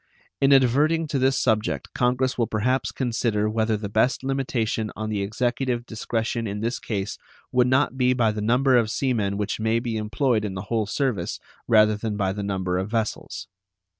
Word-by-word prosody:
In 135 0 +4
adverting 145 +5 +4
to 140 - 0
this 135 +1 +2
subject 110 -3 0
Congress 125 +1 +1
will 115 -2 0
perhaps 120 +3 0
consider 115 -4 0
whether 110 0 0
the 105 0 -5
best 110 +6 +1
limitation 125 -5 -1
on 110 0 -4
the 105 -2 -1
Executive 120 +3 -1
discretion 115 0 -2
in 105 +1 -4
this 115 +2 -2
case 100 -3 -4 0.3
would 125 0 +3
not 130 0 +2
be 125 0 +4
by 115 -4 +2
the 105 0 -4
number 125 +4 +3
of 115 -3 +2
sea 130 +2 0
men 100 -3 -1
which 105 +1 -2
may 110 +1 +1
be 115 -1 -2
employed 110 +1 0
in 100 -3 -4
the 95 - -4
whole 110 -3 +1
service 110 -6 -1 0.3
rather 110 -1 +5
than 105 0 -3
by 95 -2 0
the 105 - -5
number 95 -2 -1
of 95 +2 -3
vessels. 110 -1 -3
115 Hz, 190 wpm, -24 LUFS, 105-125 Hz, 0.3 s, rather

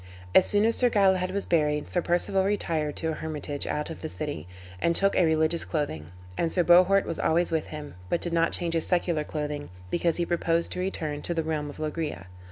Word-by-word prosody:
As 185 - +7
soon 205 +1 +4
as 230 - +2
Sir 245 - +4
Galahad 190 -4 +3
was 200 +1 -2
buried 150 -3 +1
Sir 175 - 0
Perceval 175 +3 +1
retired 165 -7 -1
to 160 - -2
a - - -1
hermitage 150 -2 -4
out 150 +2 -2
of - - -9
the 160 - -4
city, 145 - -5 0.3
and 170 - +2
took 195 +2 +3
a 185 - +4
religious 160 +1 +2
clothing; 145 - -3 0.3
and 165 - 0
Sir 180 - +2
Bohort 185 +3 +5
was 165 - -4
always 170 +2 +2
with 160 -1 -1
him, 150 -1 -8 0.2
but 170 - +1
did 175 - -3
not 165 0 +2
change 170 -1 -1
his 165 -1 +1
secular 170 -3 +1
clothing, 150 -1 -4 0.2
because 170 -1 +1
he 175 - 0
purposed 170 -1 0
to - - -3
return 155 -6 -3
to 170 - -2
the 165 - 0
realm 155 -2 -2
of 145 - -10
Loegria. 155 - -4
165 Hz, 220 wpm, -27 LUFS, 150-175 Hz, 0.3 s, As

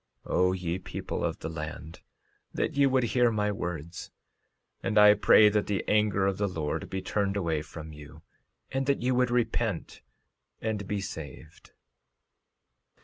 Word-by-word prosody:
13:39 - - -5
O 90 0 +4
ye 90 -1 -3
people - - -5
of - - -1
the - - -4
land, 80 0 -7 0.5
that - - -2
ye 140 -1 +4
would 130 -1 +2
hear 120 +1 +3
my 105 -2 0
words! 85 -3 -5 0.7
And 105 - -1
I 105 0 +9
pray 105 0 +6
that 105 0 0
the 100 -2 -2
anger 105 -2 +2
of 95 -1 0
the 100 - +1
Lord 80 -5 -3
be 95 0 -4
turned 100 -1 -1
away 80 -5 0
from 80 0 -9
you, 75 +1 -13 0.5
and 135 0 -1
that 140 -3 +1
ye 125 - +2
would 125 0 +2
repent 115 -5 -1 0.6
and 105 -3 -3
be 105 0 -2
saved. 80 -7 -9
100 Hz, 160 wpm, -28 LUFS, 85-110 Hz, 0.7 s, I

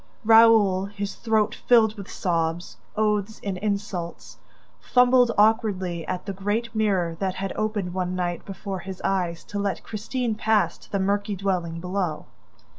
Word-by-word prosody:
Raoul, 220 -4 +6
his 200 0 -5
throat 220 -2 +1
filled 220 -3 +3
with 200 -3 -9
sobs, 170 -1 -2 0.2
oaths 210 0 0
and 195 -3 -3
insults, 200 -4 -4 0.4
fumbled 250 -1 +4
awkwardly 205 -6 +2
at 185 0 -3
the 200 - -4
great 210 +5 -2
mirror 195 -6 +1
that 190 -2 -1
had 195 0 -3
opened 210 -4 -2
one 185 -1 -2
night, 175 -1 -2
before 195 -1 -6
his 190 +1 -8
eyes, 175 -3 -1
to 205 - -5
let 200 -1 -2
Christine 230 +2 -3
pass 210 -5 +1
to - - -18
the 200 - 0
murky 200 +1 0
dwelling 180 -4 -2
below. 180 -3 -3
200 Hz, 150 wpm, -25 LUFS, 185-215 Hz, 0.4 s, Raoul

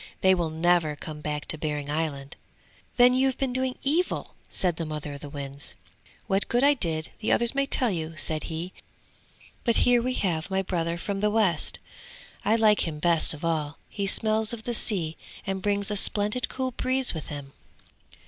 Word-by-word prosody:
They 190 0 +6
will 170 -3 0
never 160 -1 +2
come 150 +1 -8
back 150 -1 -3
to 155 - -1
Behring 150 -2 -3
Island!' 150 -3 -3 0.6
'Then 245 0 +7
you've 260 0 +2
been 265 -2 -1
doing 260 0 -1
evil!' 325 +6 0 0.2
said 175 -3 0
the 165 - -2
mother 150 -1 -5
of 140 - -8
the 145 - -8
winds. 140 -1 -4 0.5
'What 195 +1 +1
good 245 +2 +2
I 285 +1 +6
did, 160 - -2
the 220 - -1
others 235 0 +2
may 275 0 +1
tell 250 -4 +3
you,' 165 -2 -4
said 155 +1 +1
he. 170 +3 -5 0.9
'But 235 -2 +2
here 245 -1 +5
we 255 +1 -1
have 170 -5 0
my 190 0 0
brother 170 -2 -1
from 195 +3 -3
the 210 +1 +2
west; 205 -7 +2 0.7
I 215 +3 +3
like 215 -4 +4
him 155 -2 -4
best 165 0 +3
of 150 - -7
all; 155 -3 -1
he 200 -1 -3
smells 220 +2 +1
of 225 -2 -6
the 240 - -2
sea 180 -8 +1 0.3
and 195 -1 -2
brings 200 +1 0
a - - 0
splendid 210 +4 +1
cool 260 -1 -2
breeze 255 +1 +1
with 160 -3 -6
him!' 140 -2 -7
185 Hz, 190 wpm, -26 LUFS, 155-230 Hz, 0.9 s, Then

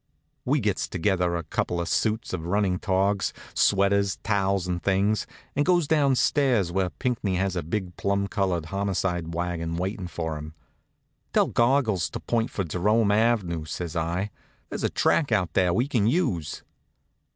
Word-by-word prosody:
We 145 +4 +2
gets 105 -5 0
together 90 -1 0
a 85 - -2
couple 85 +2 -2
suits 110 +4 0
of 85 -2 -3
running 95 -1 +1
togs, 95 +1 +1 0.2
sweaters, 100 0 +3
towels 100 -3 +1
and 90 -1 -2
things, 100 +3 +1 0.3
and 145 - +3
goes 175 -2 +3
downstairs 135 - +2
where 95 0 0
Pinckney 115 -4 -2
has 95 0 0
a 90 - -1
big 90 +2 -4
plum 100 0 0
colored 95 -5 -1
homicide 90 -3 -2
wagon 85 -1 -2
waitin' 95 +1 -3
for 80 -3 -4
him. 75 +1 -9 0.8
"Tell - - +4
Goggles 120 - +2
to - - -5
point 115 -1 0
for 100 - -2
Jerome 100 +6 +2
ave.," 105 -7 +1
says 80 +2 -5
I. 85 +5 -1 0.4
"There's - - -5
a - - +2
track 145 -6 +2
out 90 -6 +1
there 90 -2 +3
we 120 +10 +1
can 115 -7 +1
use." 95 - 0
95 Hz, 155 wpm, -26 LUFS, 85-110 Hz, 0.8 s, Tell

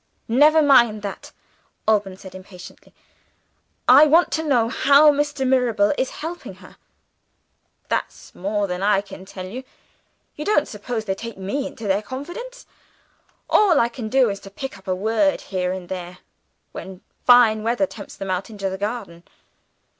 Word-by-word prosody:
"Never 300 +6 +5
mind 235 -7 +4
that!" 200 - -7 0.6
Alban 205 -3 +1
said 190 -1 -12
impatiently. 185 -1 -13 1.0
"I 275 +5 +8
want 330 +4 +4
to 320 - -1
know 250 -7 +2
how 285 +4 +5
Mr. 290 -1 -1
Mirabel 240 -5 +2
is 260 - -1 0.2
helping 350 +2 -7
her?" - - -17 1.1
"That's - - -4
more 205 +2 -2
than 180 -1 -4
I 200 0 +3
can 195 -1 -12
tell 185 -1 -8
you. 240 +8 -7 0.7
You 300 - -6
don't 300 -5 +2
suppose 220 +1 -5
they 190 - -1
take 230 +2 -8
me 205 +9 -3
into 230 -6 -8
their 195 +1 +1
confidence? 350 - -8 0.8
All 390 -8 +4
I 235 - +2
can 235 -2 -7
do 255 -2 +3
is 200 - -6
to 195 - -12
pick 265 +7 -7
up 190 - -17
a 185 - 0
word, 225 +9 +1
here 180 -2 -3
and 185 -1 -6
there, 180 -1 -7 0.5
when 190 -1 -9 0.3
fine 240 -3 +6
weather 235 +6 +1
tempts 210 -7 -11
them 195 -1 -4
out 185 +3 -3
into 200 -3 -4
the 190 - -6
garden. 205 -5 -5
220 Hz, 160 wpm, -22 LUFS, 195-275 Hz, 1.1 s, I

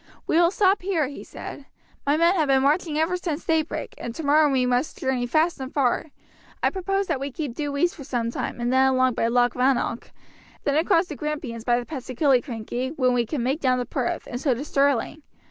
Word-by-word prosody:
"We - - 0
will 340 0 +5
stop 390 +1 +2
here," 360 -6 0
he 280 - -9
said. 280 - -9 0.4
"My 290 +2 +3
men 335 +2 +4
have 320 -6 +1
been 265 -1 +3
marching 300 +2 +1
ever 320 +3 +1
since 335 -3 -4
daybreak, 320 -1 -1
and 235 0 -6
tomorrow 300 -1 +3
we 260 -2 +2
must 250 +4 0
journey 260 -2 -1
fast 315 +6 +1
and 265 0 -6
far. 270 0 +1 0.6
I - - +3
propose 390 +1 -1
that 270 - -1
we 275 +1 -3
keep 285 -2 -4
due 285 +1 -3
east 345 +4 +2
for 285 - -10
some 240 -4 -2
time - - -4
and 240 +1 0
then 265 0 +5
along 255 -1 +3
by 225 - 0
Loch 245 +1 +2
Rannoch, 250 -2 0 0.5
then 285 - +1
across 335 +2 +3
the 310 - -7
Grampians 295 -7 -4
by 240 -1 +3
the 240 - -6
pass 265 -4 -7
of 255 - -6
Killiecrankie, 255 -1 0
when 255 -2 +3
we 240 -2 +1
can 260 -1 -2
make 270 +5 0
down 255 -2 +2
to 250 - -2
Perth, 245 0 -2
and 245 - -6
so 270 -4 +2
to 270 +5 -5
Stirling. 280 0 +1
275 Hz, 225 wpm, -24 LUFS, 250-315 Hz, 0.6 s, will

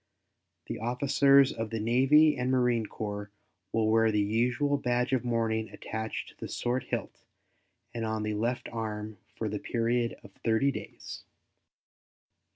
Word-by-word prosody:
The - - -5
officers 135 +3 +4
of 115 -1 -4
the 115 0 -3
Navy 135 +7 +5
and 125 -1 -1
Marine 125 -4 +2
Corps 105 -1 -5 0.4
will 110 -1 +1
wear 110 0 +4
the 105 - +1
usual 120 +7 +1
badge 125 0 0
of 130 - +1
mourning 115 -2 0
attached 110 0 -5
to - - -18
the - - -5
sword 125 +2 -2
hilt - - -5 0.7
and 115 - -3
on 110 -1 -2
the 105 0 -1
left 120 +4 -1
arm 110 -2 -5 0.2
for 110 - -3
the 105 0 -3
period 120 +1 0
of - - -13
thirty 115 +5 +3
days. - - -8
115 Hz, 150 wpm, -29 LUFS, 110-125 Hz, 0.7 s, Navy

